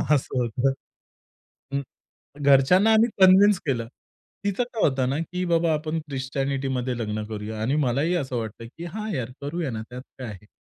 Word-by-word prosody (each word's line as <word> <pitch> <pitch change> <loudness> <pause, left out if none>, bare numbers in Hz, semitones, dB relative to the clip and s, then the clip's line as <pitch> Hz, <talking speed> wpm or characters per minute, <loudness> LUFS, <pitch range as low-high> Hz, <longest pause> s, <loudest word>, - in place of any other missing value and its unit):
असं 135 -1 -2
होतं. 120 +3 +1 1.0
हं. 140 0 0 0.6
घरच्यांना 140 +10 +5
आम्ही 220 +2 +5
कन्विंस 190 +1 +7
केलं. 120 -5 0 0.6
तिचं 200 +4 0
काय 235 -2 -5
होतं 130 -2 0
ना, 135 +3 0
की 180 0 -1
बाबा 170 -1 +2
आपण 155 +1 -1
ख्रिश्चनिटीमध्ये 135 -1 -2
लग्न 110 -2 -2
करूया 110 0 -5
आणि 125 +6 +1
मलाही 140 +8 +1
असं 135 -7 -2
वाटतं, 115 0 -5
की 170 - -6
हां, 215 +5 -5
यार, 125 -4 -3
करूया 150 +1 -3
ना, 110 -2 -4
त्यात 125 +1 -7 0.2
काय 130 - -5
आहे. 105 -1 -10
135 Hz, 165 wpm, -25 LUFS, 125-170 Hz, 1.0 s, कन्विंस